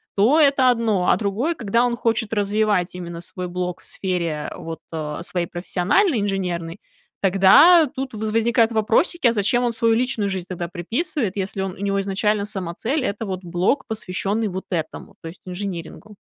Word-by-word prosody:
то 235 +11 +4
это 275 -4 +5
одно. 225 -6 +1
А - - +4
другое, 225 - -1
когда 230 -2 +1
он 245 -1 +1
хочет 230 -2 -1
развивать 205 -3 +1
именно 170 -2 -7
свой 180 +1 -6
блог 180 0 -4
в - - -13
сфере 170 -5 -3
вот, 165 0 -7
э, 150 -2 -4
своей 175 0 -2
профессиональной, 200 - +1
инженерной, 180 -3 -3 0.4
тогда 275 - +6
тут 265 -1 -4
во 215 - -7
возникают 230 +1 +2
вопросики: 230 - +2
а 230 - +3
зачем 235 +3 +1
он 240 - +1
свою 230 0 +2
личную 235 -4 0
жизнь 190 -2 -3
тогда 175 -2 -4
приписывает, 210 - -2
если 195 0 -3
он 190 0 -2
у - - -15
него 200 0 -1
изначально 200 +1 0
сама 190 -5 -4
цель- 270 - -1
это 225 -1 -3
вот 190 -2 -5
блог, 180 +9 0
посвящённый 215 0 -2
вот 190 0 -6
этому, 165 -4 -4
то - - -8
есть 170 - -13
инжинирингу. 190 +2 -6
200 Hz, 175 wpm, -22 LUFS, 180-230 Hz, 0.4 s, тогда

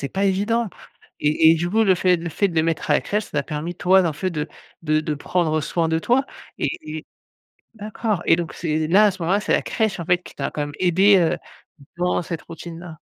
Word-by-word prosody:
c'est 140 - -3
pas 195 +5 -1
évident 210 +4 +1 0.5
et 155 +2 +4
et - - +4
du 170 +2 -2
coup, 220 +3 +3
le 190 -3 +4
fait 180 0 +3
le 170 0 -5
fait 195 +5 0
de 170 - -8
le 160 - +4
mettre 165 -1 -2
à - - +5
la - - +3
crèche, 210 +1 -2
ça - - -16
t'a 145 -2 0
permis, 155 +5 -5
toi, 190 +2 +4
en 165 - 0
fait 185 +5 -3
de 150 -1 -3 0.3
de 155 -1 +1
de 155 -1 -2
prendre 155 +1 0
soin 165 +2 -1
de 160 0 +1
toi 250 +9 +2 0.3
et - - 0 0.3
et - - -12 0.7
d'accord 215 -2 -3
et 165 - +5
donc 170 -5 -4
c'est 155 -2 -1
là, 205 +5 +6
à - - +4
ce 185 -2 -8
moment-là, 190 +5 +2
c'est - - -1
la - - +2
crèche, 220 -5 -1
en - - -4
fait, 180 +2 +3
qui - - -13
t'a - - -3
quand - - -5
même 145 - -5
aidé, 190 +3 +5
heu, 165 -2 +1 0.6
dans 180 0 +1
cette 165 -1 -5
routine-là. 165 0 -9
175 Hz, 245 wpm, -22 LUFS, 160-195 Hz, 0.7 s, là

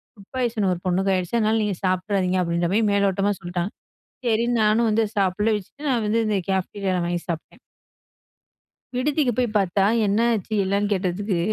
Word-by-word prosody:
Food 200 -2 -17
poison 230 -6 0
ஒரு 170 - -5
பொண்ணுக்கு 190 +2 +1
ஆயிடுச்சு. 185 +5 -1
அதனால 220 0 +2
நீங்க 205 -3 -1
சாப்ட்றாதீங்க" 185 0 +1
அப்படின்ற 170 0 0
மாதிரி 215 0 +3
மேலோட்டமா 200 0 +2
சொல்லிட்டாங்க. 175 +2 -3 0.6
சரின்னு 235 +1 +2
நானும் 220 +2 +3
வந்து 220 +1 +2
சாப்பிடல 205 +3 +2
வச்சுட்டு, 280 +9 -9
நான் 235 -4 +1
வந்து 225 +2 +2
இந்த 210 -2 +1
கேப்டீரியால 190 -1 -1
வாங்கி 175 0 -2
சாப்பிட்டேன். 165 -2 -5 1.4
விடுதிக்கு 275 0 +1
போய் 240 -4 0
பார்த்தா 195 0 +2 0.2
என்ன 200 +2 +2
ஆச்சு 215 0 -3
என்னன்னு 200 +2 0
கேட்டதுக்கு, 190 0 -1
200 Hz, 155 wpm, -23 LUFS, 185-220 Hz, 1.4 s, மாதிரி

